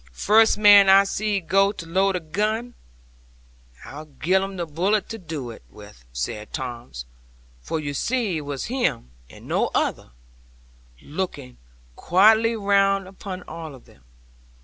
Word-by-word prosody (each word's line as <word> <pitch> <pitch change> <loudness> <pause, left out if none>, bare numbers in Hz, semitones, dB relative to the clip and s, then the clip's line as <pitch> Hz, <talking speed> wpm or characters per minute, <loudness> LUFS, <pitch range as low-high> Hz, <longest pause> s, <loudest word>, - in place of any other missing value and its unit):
'"First 220 - +4
man 205 -2 +7
I 195 +1 +7
see 205 +1 -1
go 195 +3 +2
to 170 - -9
load 190 +3 +1
a - - -1
gun, 215 +9 -2 1.1
I'll 150 +3 -10
gi'e 150 +5 -3
'un 195 0 -5
the 175 -2 -3
bullet 185 +7 -1
to 225 - -6
do 155 - -6
it - - -12
with," - - -15
said 60 - -5
Tom; 120 -2 -6 0.7
for 160 - -3
you 145 -2 -4
see 225 - -1
it - - -4
was 145 -2 -5
him 240 - -2 0.2
and - - -15
no - - 0
other, - - -1 0.9
looking 145 -6 -6 0.4
quietly 220 +6 +4
round 195 -2 +1
upon 190 -1 -8
all 160 -4 -9
of 125 - -17
them. 70 - -22
185 Hz, 150 wpm, -23 LUFS, 145-205 Hz, 1.1 s, man